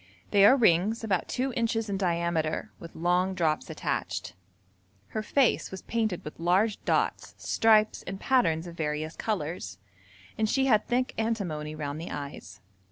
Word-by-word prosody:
They 200 -1 +6
are 260 +6 +7
rings 215 +1 +3
about 195 -6 0
two 260 0 -2
inches 225 -2 0
in 200 - -2
diameter, 170 -4 -1
with 170 - -11
long 180 +3 +1
drops 160 -4 0
attached. 90 - -3 0.8
Her 215 - -3
face 260 +3 +2
was 190 - -8
painted 220 -6 -2
with 150 - -8
large 190 +6 +1
dots, - - 0
stripes, 215 -1 +3
and 195 +1 -5
patterns 180 -12 +2
of 170 -1 -9
various 155 0 -3
colours, 160 - -3 0.6
and 220 -1 +2
she 270 +3 +2
had 215 -5 +3
thick 250 +1 0
antimony 175 -10 -2
round 150 0 -4
the 170 - -6
eyes. 140 -9 -7
185 Hz, 155 wpm, -28 LUFS, 160-220 Hz, 0.8 s, are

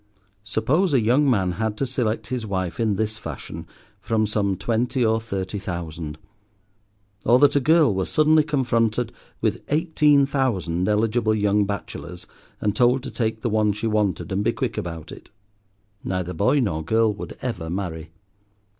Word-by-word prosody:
Suppose 145 - +1
a - - +5
young 125 +6 +3
man 95 -7 +2
had 110 +3 -2
to 135 - 0
select 120 -4 -2
his 125 -2 -2
wife 95 -5 -3
in 110 -3 +1
this 110 +2 -2
fashion 80 -9 -7 0.3
from 110 -1 0
some 100 -2 0
twenty 120 +4 0
or 110 0 +2
thirty 100 -2 -4
thousand; 85 -5 -5 1.1
or 120 +2 +5
that 145 +2 +4
a - - +5
girl 155 -3 +4
were 95 -1 -1
suddenly 155 0 +4
confronted 125 -5 0 0.3
with - - 0
eighteen 150 -2 +3
thousand 100 - 0
eligible 110 +1 +2
young 105 0 +2
bachelors, 90 -3 -6 0.3
and 105 0 0
told 125 +3 +3
to 135 - -6
take 110 -2 -2
the - - -1
one 105 -1 +2
she 105 +3 -5
wanted 105 -4 0
and 95 +2 0
be - - +2
quick - - -2
about 85 -2 -5
it? - - -12 0.7
Neither 90 -1 -2
boy 105 - +2
nor 80 -9 -1
girl 110 +5 +2
would 100 - -8
ever 90 -10 -3
marry. 85 -3 -4
110 Hz, 165 wpm, -23 LUFS, 95-125 Hz, 1.1 s, a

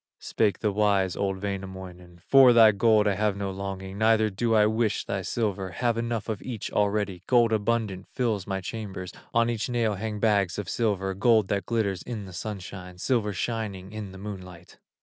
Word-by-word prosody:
Spake 105 -3 0
the 105 - +1
wise, 100 -3 +2
old 95 -1 -1
Wainamoinen: 95 -3 -7
"For 135 -3 +7
thy 115 -2 +8
gold 105 +1 +3
I 100 - +3
have 105 0 0
no 100 -1 -3
longing, 95 0 -6
Neither 110 -1 +3
do 115 +4 0
I 105 -1 +5
wish 110 0 0
thy 100 -1 -2
silver, 100 -2 -2
Have 120 +4 0
enough 115 -1 -2
of 110 -3 -3
each 115 -4 -5
already; 105 -3 0
Gold 120 -3 +4
abundant 105 -3 -1
fills 110 -7 -2
my 95 -1 -2
chambers, 95 -3 -6 0.2
On 115 0 +3
each 115 0 -2
nail 115 -3 +1
hang 105 +1 -4
bags 100 -4 +2
of 105 - -4
silver, 100 -4 0
Gold 110 0 +3
that 100 -1 -1
glitters 100 -6 0
in 110 -5 -6
the 95 - -11
sunshine, 90 -1 -7
Silver 110 +1 0
shining 100 -2 -4
in 105 -3 -6
the 95 - -11
moonlight." 90 -4 -9
105 Hz, 185 wpm, -26 LUFS, 95-110 Hz, 0.2 s, thy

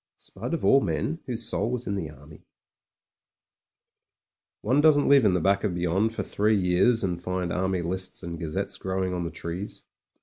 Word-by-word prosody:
Spud 165 - -5
of - - -4
all 135 - +6
men, 80 - -2
whose 115 -3 -3
soul 115 - 0
was 125 0 -3
in 100 - -2
the 95 -6 -3
Army)— 75 +1 -14 2.2
ont 130 +7 +3
doesn't 150 -2 +5
live 140 -2 +6
in 100 -4 +4
the - - +2
back 100 +4 +2
of 100 -5 -1
beyond 95 +6 0
for - - -2
three 105 +1 +1
years 95 +6 +3
and 90 -2 -2
find 90 -1 -2
Army 95 -1 0
lists 95 +2 -4
and 85 -1 -6
gazettes 80 -3 -3
grow 95 0 -2
ing 90 - -2
on 90 -1 -2
the - - -2
trees. 85 +5 -6
95 Hz, 190 wpm, -26 LUFS, 85-110 Hz, 2.2 s, all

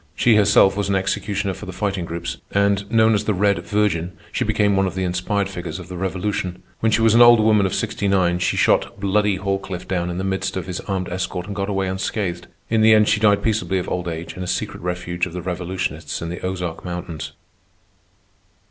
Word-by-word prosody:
She 120 - +4
herself 100 -2 +5
was 100 -1 -1
an 100 - +2
executioner 95 +1 -1
for - - -9
the - - -5
Fighting 95 -1 -2
Groups, 85 0 -5
and, 100 0 +1
known 110 -1 +4
as 105 0 0
the 105 - +1
Red 100 +1 +2
Virgin, 95 -4 0 0.2
she - - -1
became 105 -2 +2
one 95 0 +2
of 95 - -5
the 95 - -1
inspired 90 +3 -1
figures 90 -5 -6
of - - -10
the 90 - -6
Revolution. 95 0 -3 0.2
When 110 - +2
she 115 - +2
was 115 -1 +5
an 115 - +6
old 120 -1 +8
woman 105 -2 +4
of 95 - -3
sixty 100 - -2
nine 90 -3 +2
she 90 - 0
shot - - +2
"Bloody" 100 +1 +2
Halcliffe 95 -1 -3
down 90 -2 -1
in 85 - -4
the 95 - -2
midst 95 0 -2
of 95 - -3
his 90 -2 -4
armed 95 -3 -3
escort 90 0 -3
and 100 0 -6
got 100 +1 -2
away 95 -1 0
unscathed. 95 -2 -3 0.2
In 110 -1 +2
the 110 0 +7
end 105 0 +4
she 110 - +3
died 105 -2 +3
peaceably 110 -3 0
of 90 - -3
old 90 0 -3
age 85 0 -5
in 90 - -7
a 90 - -4
secret - - -3
refuge 90 0 -2
of 85 - -10
the 90 - -4
revolutionists 90 -3 -3
in 85 - -5
the 85 - -6
Ozark 90 -3 -4
mountains. 85 -3 -6
95 Hz, 225 wpm, -21 LUFS, 90-105 Hz, 0.2 s, old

